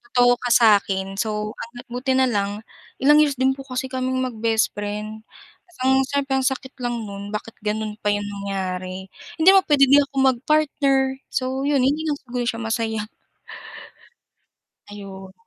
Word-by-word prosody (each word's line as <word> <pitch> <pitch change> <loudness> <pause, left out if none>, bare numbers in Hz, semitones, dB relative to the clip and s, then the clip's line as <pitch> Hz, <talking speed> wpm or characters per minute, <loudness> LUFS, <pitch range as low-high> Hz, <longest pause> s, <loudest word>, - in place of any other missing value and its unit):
Totoo 245 0 +5
ka 245 - -4
sakin 195 -3 +3
so 210 -1 -2
ang 230 - -9 0.2
buti 255 +2 -1
nalang 210 -5 0 0.4
ilang 295 +2 +6
years 290 -2 +3
din 260 +1 +2
po 270 0 -7
kasi 255 0 -4
kaming 260 0 -1
mag 250 -3 -4
bestfriend, 215 -1 -2 0.8
syempre 280 -1 -1
ang 265 - 0
sakit 265 0 -3
lang 240 -2 -2
no'n 200 -1 -7
bakit 215 +1 -5
gano'n 215 0 -2
pa 210 - -4
'yong 205 0 -2
nangyari, 190 -2 -5 0.3
hindi 320 +4 +7
mo 390 - +7
pwede 290 -2 +5
di 280 - +7
ako 280 -1 -2 0.2
mag-partner, 280 +1 +1 0.3
so 260 +1 -2
'yon 285 -2 +2
hindi 300 +4 +1
lang 295 -2 -1
siguro 245 -1 -3
siya 230 -1 -2
masaya. 220 -1 -2 1.8
Ayon. 195 -2 -10
235 Hz, 150 wpm, -22 LUFS, 205-265 Hz, 1.8 s, hindi